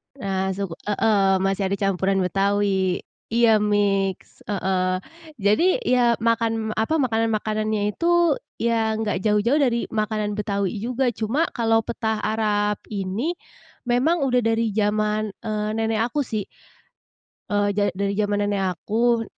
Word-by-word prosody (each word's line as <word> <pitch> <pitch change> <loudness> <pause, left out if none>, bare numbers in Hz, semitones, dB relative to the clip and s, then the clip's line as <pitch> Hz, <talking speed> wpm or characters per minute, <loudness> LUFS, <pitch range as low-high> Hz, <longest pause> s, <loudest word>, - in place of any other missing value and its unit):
Nah, 190 -5 -2
suku 195 -4 -4
heeh, 200 -2 +3
masih 195 0 0
ada 195 - 0
campuran 195 -1 0
Betawi. 195 -1 +1 0.2
Iya 225 -1 +4
mix, 200 -2 0
heeh, 185 -2 0 0.3
jadi 270 - +2
ya 245 - +3
makan 225 -1 +1
apa, 270 +9 +1
makanan-makanannya 215 -4 0
itu 340 +1 +2 0.2
ya 225 -1 0
nggak 215 -3 -1
jauh-jauh 215 +8 +2
dari 240 -4 +2
makanan 215 -1 -1
Betawi 200 -1 -2
juga, 245 +3 0
cuma 230 +8 0
kalau 225 -2 +1
petah 220 -1 -2
Arab 210 -1 0
ini 205 - -2 0.5
memang 270 +6 +1
udah 250 -2 +2
dari 225 -1 +1
zaman, 215 +1 0 0.2
eee, 215 -1 -2
nenek 225 0 0
aku 285 +4 -1
sih. 215 -5 -4 1.0
Eee, 205 0 +1
ja 205 +1 0
dari 200 +1 -1
jaman 205 -1 +1
nenek 195 -3 0
aku. 230 +5 +1
215 Hz, 130 wpm, -23 LUFS, 200-230 Hz, 1.0 s, Iya